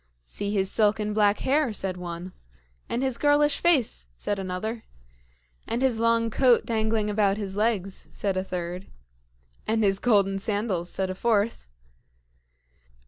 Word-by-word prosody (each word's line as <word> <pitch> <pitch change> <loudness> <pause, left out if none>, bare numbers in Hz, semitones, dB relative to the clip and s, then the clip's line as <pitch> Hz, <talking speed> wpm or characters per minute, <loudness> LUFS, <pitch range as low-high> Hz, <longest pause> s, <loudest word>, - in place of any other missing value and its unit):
"See 200 - -4
his 195 -2 +2
silken 210 0 +2
black 205 -1 +3
hair!" 280 -1 +2
said 190 -3 -2
one. 175 0 -7 0.6
"And 245 - -1
his 260 -3 -1
girlish 290 0 +3
face!" 265 - +2
said 200 - -3
another. 195 +5 -4 0.9
"And 235 +3 -1
his 250 -4 +2
long 230 0 +2
coat 250 0 +4
dangling 220 -1 0
about 205 -1 +1
his 195 -2 -5
legs!" 205 -3 -1
said 195 -2 -2
a 185 - -1
third. 180 0 -5 0.8
"And 220 0 +1
his 195 -1 +2
golden 200 -4 +2
sandals!" 200 -4 -2
said 190 -1 -2
a - - -3
fourth. 220 - 0
210 Hz, 140 wpm, -26 LUFS, 190-230 Hz, 0.9 s, coat